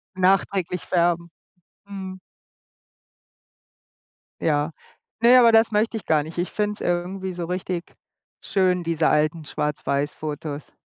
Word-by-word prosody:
Nachträglich 185 -1 +1
färben. 170 -1 +1 0.6
Mhm. 190 -2 -7 2.2
Ja. 150 0 +1 0.5
Ne, 245 +2 +8
aber 235 -2 +6
das 225 0 +5
möchte 220 +2 +1
ich 220 - -6
gar 155 -2 +3
nicht. 160 +3 -9
Ich 175 - -1
finde 210 -1 -1
es - - -13
irgendwie 185 +2 -2
so 175 -1 -5
richtig 180 0 -4 0.5
schön, 185 -2 +1
diese 165 -1 +1
alten 155 +1 +1
schwarz-weiss-Fotos. 150 0 -3
180 Hz, 115 wpm, -23 LUFS, 155-190 Hz, 2.2 s, Ne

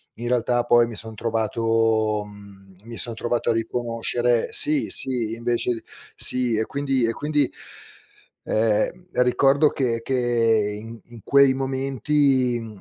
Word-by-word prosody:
in 120 +1 -6
realtà 120 0 0
poi 120 -1 +3
mi 115 - -9
son 110 0 -6
trovato 110 -1 -1
mhmm, 100 -2 -16
mi 115 0 -10
son 115 - +6
trovato 120 +1 -3
a - - +2
riconoscere 115 +1 -1
sì, 300 -1 +4
sì, 120 -4 +2
invece 120 0 -2 0.3
sì, 125 -2 +4
e 110 0 -1
quindi 135 -3 -1
e 115 - 0
quindi, 145 +2 -1 0.9
ehm, 115 +12 -1 0.2
ricordo 140 +4 +2
che 115 -4 -2
che 115 -5 0
in 115 +1 -10
in 120 -1 -14
quei 140 -1 +4
momenti, 135 -1 0
mhmm, 110 -2 -10
120 Hz, 135 wpm, -22 LUFS, 115-130 Hz, 0.9 s, son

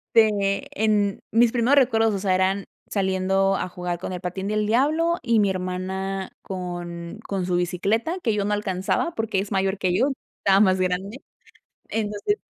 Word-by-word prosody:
Este, 205 -3 +3 0.2
en 205 -2 +2
mis 230 +1 +4
primeros 245 +3 +3
recuerdos, 225 -5 +4
o 200 - -1
sea, 190 -1 +1
eran 190 +1 +1 0.2
saliendo 195 0 +1
a - - -2
jugar 180 -1 -4
con 185 - -5
el 180 - -5
patín 190 +2 -4
del 215 0 0
diablo 310 +9 +2
y 235 -3 +3
mi 205 -1 +3
hermana 190 +1 -3
con 175 0 -6
con 195 -3 -2
su 180 -1 0
bicicleta, 205 - 0
que 225 -8 +1
yo 205 -1 0
no 210 - 0
alcanzaba 200 - -1
porque 220 -3 -1
es 195 +2 -4
mayor 195 0 +1
que 180 -1 +1
yo, - - +3 0.3
estaba 195 0 +3
más 190 -2 +4
grande. 185 +5 -1 0.7
Entonces, 210 - -1
195 Hz, 175 wpm, -24 LUFS, 185-220 Hz, 0.7 s, mis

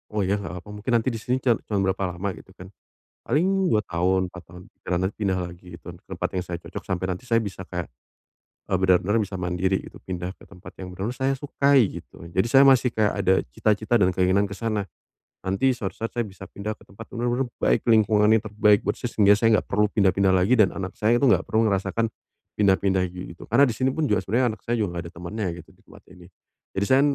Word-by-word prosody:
"Oh 105 - +1
ya 100 +2 0
enggak 90 -2 -7
apa-apa. 105 +2 -10
Mungkin 125 - -3
nanti 115 +2 +1
di 115 - -5
sini 125 +3 -2
can 120 -3 +3
cuma 100 -2 0
berapa 95 -2 -3
lama." 95 +2 -2
Gitu 95 +1 -14
kan. 90 +2 -12 0.6
Paling 185 +7 +2
2 105 -1 +2
tahun, 95 +2 +1
4 90 - -10
tahun, 90 +1 -14 0.3
nanti 95 +2 0
pindah 95 -2 +1
lagi 90 0 -7
ke - - -29 0.2
tempat 95 - -3
yang 90 - -1
saya 90 -1 -5
cocok - - -7
sampai 95 0 -3
nanti 120 +8 -11
saya 115 - +4
bisa 100 -4 -3
kayak, 90 -2 -5 0.8
e - - -5
benar-benar 95 +4 +3
bisa 95 -2 -4
mandiri 90 +2 0
gitu, - - -13
pindah 90 0 -5
ke - - -39
tempat 90 +1 -13
yang 90 - -6
benar-benar 95 +6 -4
saya 135 +1 -1
sukai, 140 -5 +2
gitu. - - -15
Jadi 95 +4 +2
saya 135 +2 +7
masih 130 -2 +5
kayak 110 -2 +1
ada 95 0 +4 0.2
cita-cita 110 - 0
dan 90 - +5
keinginan 95 +2 +2
ke 100 - -7
sana. 105 -4 -2 0.5
Nanti 100 +8 +1
suatu 115 -6 -5
saat 115 - -4
saya 120 - -2
bisa 95 0 -11
pindah 105 +2 -5
ke - - -20
tempat 105 +4 -12
yang 120 - -2
benar-benar 125 +2 0
baik - - +2
lingkungannya, 110 0 +4
terbaik 105 -1 +3
buat 105 - -1
saya 120 - -2
sehingga 105 -3 +4
saya 115 +1 +3
enggak - - -2
perlu 105 +1 +3
pindah-pindah 95 -2 +2
lagi, 95 +7 +2
dan 100 -4 +6
anak 95 0 -4
saya 110 +3 +3
itu 130 - +1
enggak 130 - +3
perlu 110 +1 +2
ngerasakan, 100 +4 -1 0.5
pindah-pindah 95 -1 +3
ge 90 +1 -8
gitu. - - -13
Karena 135 +6 +5
di 125 - +1
sini 130 +4 0
pun 150 +4 -1
juga 105 -7 +2
sebenarnya 115 +5 +1
anak 110 - -11
saya 120 - +1
juga 90 -6 -2
enggak 85 - -8
ada - - -16
temennya 90 +5 -4 0.2
gitu - - -23
di - - -28
tempat - - -16
ini. 90 -2 -15 0.5
Jadi 100 - +1
saya, 130 +5 +4
100 Hz, 230 wpm, -24 LUFS, 95-115 Hz, 0.8 s, saya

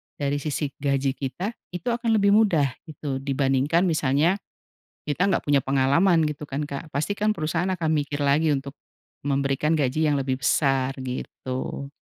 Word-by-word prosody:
dari 145 0 -1
sisi 145 -1 -2
gaji 140 -1 +1
kita, 175 - -3 0.2
itu 180 +7 -3
akan 230 -1 +1
lebih 200 -1 +4
mudah 175 -11 +4 0.2
gitu. 140 -3 -4
Dibandingkan 135 +4 +1
misalnya 160 +2 +2 0.6
kita 150 +6 0
enggak 190 -3 +2
punya 140 -3 +3
pengalaman 140 +6 +3
gitu 150 0 -6
kan, 140 +1 -4
Kak, 145 +3 -7
pastikan 205 +8 0
perusahaan 165 +1 -1
akan 165 -3 -1
mikir 145 -1 -1
lagi 145 +2 +3
untuk 140 +1 -4 0.5
memberikan 140 +2 +1
gaji 150 +1 +1
yang 145 -1 +2
lebih 130 -1 -1
besar, 135 0 +2
gitu. 130 +1 -5
145 Hz, 150 wpm, -25 LUFS, 135-165 Hz, 0.6 s, lebih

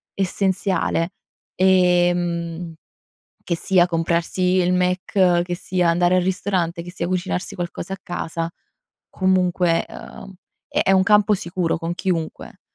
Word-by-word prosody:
essenziale. 190 -2 0 0.4
Ehm, 175 -2 +2 0.7
che 170 - -1
sia 180 0 +3
comprarsi 170 +1 -1 0.2
il 180 0 +2
McDonald's, 180 -1 +2
che 175 0 -3
sia 180 -1 0
andare 175 +2 +3
al 180 - +3
ristorante, 180 -2 -1
che 175 - -9
sia 175 -2 -3
cucinarsi 185 +1 -2
qualcosa 175 +1 -5
a - - -10
casa, 165 -1 -4 0.6
comunque, 180 -2 +1
uhm, 195 - -10 0.4
è 290 -9 +1
un 190 -1 +5
campo 210 0 +4
sicuro 175 -2 -2
con 165 +1 -3
chiunque, 175 -3 -4
180 Hz, 120 wpm, -21 LUFS, 170-185 Hz, 0.7 s, un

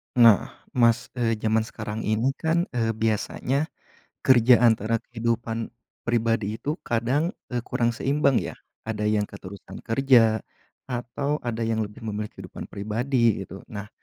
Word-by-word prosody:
Nah, 115 -5 +6 0.2
Mas, 115 -2 +3
eee, 115 -2 +1
jaman 110 +1 +1
sekarang 110 -1 -5
ini 110 +5 +2
kan, 165 +2 +2
eee, 115 -2 0
biasanya, 115 +6 0 0.6
kerja 125 -1 +6
antara 115 -1 +3
kehidupan 115 -1 -2 0.4
pribadi 115 -2 +1
itu 150 +8 -3
kadang, 125 +8 0 0.2
eee, 120 - 0
kurang 120 -2 +1
seimbang 140 +2 +2
ya. - - -5 0.3
Ada 105 -1 -2
yang 105 -1 +2
keterusan 100 0 -10
kerja 115 -3 +4 0.5
atau 125 +4 -2
ada 115 -1 -3
yang 110 0 0
lebih 105 0 -11
memilih 105 -1 -3
kehidupan - - -9
pribadi 115 +2 +1
gitu. 95 +2 -10
Nah, 105 -1 -7
115 Hz, 135 wpm, -25 LUFS, 110-125 Hz, 0.6 s, Nah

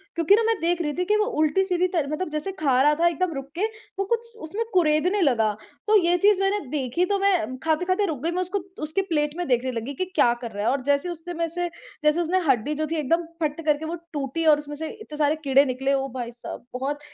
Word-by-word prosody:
क्योंकि 335 +4 +5
न 455 - +1
मैं 455 - +3
देख 345 +1 +1
रही 295 -3 -1
थी 360 - 0
कि 420 - +2
वो 425 - +2
उल्टी-सीधी 360 +3 +2
तरह 330 -6 -1
मतलब 315 +3 -2
जैसे 305 +5 -3
खा 265 -4 +3
रहा 295 +2 +5
था 345 - +5
एकदम 345 0 0
रुक 275 0 -6
के, 375 +5 +1 0.3
वो 395 - +1
कुछ 465 +2 -2
उसमें 400 +9 -3
कुरेदने 355 +3 +3
लगा। 230 -8 +3 0.4
तो 430 - +5
ये 345 +1 +3
चीज़ 400 +1 +4
मैंने 390 +1 +2
देखी 280 +4 0
तो, 405 - 0
तो - - 0
मैं 340 -10 +1
खाते-खाते 360 +5 +1
रुक 305 -6 -4
गई, 335 - +1
मैं 360 +1 -1
उसको 370 +2 -2 0.2
उसकी 315 +6 0
प्लेट 300 -5 -1
में 355 - -2
देखने 255 0 +1
लगी 235 +4 -4
कि 370 - -2
क्या 235 - +5
कर 235 -2 -5
रहा 205 0 -4
है? - - +3
और 275 - -1
जैसे 285 +5 +1
उससे 345 +1 -6
में 335 0 -1
से 350 +1 -2 0.3
जैसे 300 +3 +3
उसने 355 +3 +1
हड्डी 265 +3 +2
जो 310 +1 -1
थी - - 0
एकदम 330 +4 +1 0.2
फट्ट 305 +1 -1
करके 300 0 +1
वो 330 - -3 0.2
टूटी 290 +3 -2
और 300 -2 +6
उसमें 295 0 -7
से 315 +2 -5
इत्ते 305 -8 -9
सारे 295 0 +2
कीड़े 275 0 +5
निकले 265 +1 0
ओ 270 0 0
भाई 240 -2 -4
साहब! 235 0 -9
बहुत 275 +3 -2
315 Hz, 250 wpm, -24 LUFS, 280-360 Hz, 0.4 s, और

